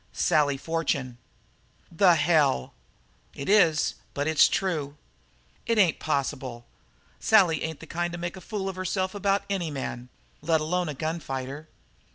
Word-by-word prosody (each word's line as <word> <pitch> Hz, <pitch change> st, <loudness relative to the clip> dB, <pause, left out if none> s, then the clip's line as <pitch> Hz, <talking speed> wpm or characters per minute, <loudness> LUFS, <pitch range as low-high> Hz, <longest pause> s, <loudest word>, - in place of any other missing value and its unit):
"Sally 145 Hz, -2 st, +2 dB
Fortune." 140 Hz, -5 st, -2 dB, 0.7 s
"The 175 Hz, +1 st, +5 dB
hell!" 145 Hz, -, +2 dB, 0.6 s
"It 140 Hz, -, -6 dB
is; 175 Hz, -7 st, +4 dB, 0.2 s
but 145 Hz, +1 st, -1 dB
it's 160 Hz, -1 st, +5 dB
true." 155 Hz, -6 st, -2 dB, 0.7 s
"It 230 Hz, -, +1 dB
ain't 185 Hz, -6 st, +3 dB
possible. 130 Hz, -5 st, -3 dB, 0.5 s
Sally 180 Hz, -9 st, +4 dB
ain't 160 Hz, -1 st, -4 dB
the -, -, -9 dB
kind 175 Hz, +2 st, -3 dB
to 175 Hz, -, -5 dB
make 175 Hz, +1 st, -4 dB
a 185 Hz, -, -10 dB
fool 195 Hz, +1 st, -4 dB
of 190 Hz, -1 st, -5 dB
herself 185 Hz, 0 st, -2 dB
about 200 Hz, -1 st, 0 dB
any 190 Hz, -5 st, -2 dB
man, 130 Hz, -3 st, -5 dB, 0.3 s
let 160 Hz, +1 st, +2 dB
alone 175 Hz, +2 st, -1 dB
a 150 Hz, -, -5 dB
gun 160 Hz, +4 st, -3 dB
fighter." 135 Hz, +1 st, -6 dB
160 Hz, 150 wpm, -26 LUFS, 145-180 Hz, 0.7 s, The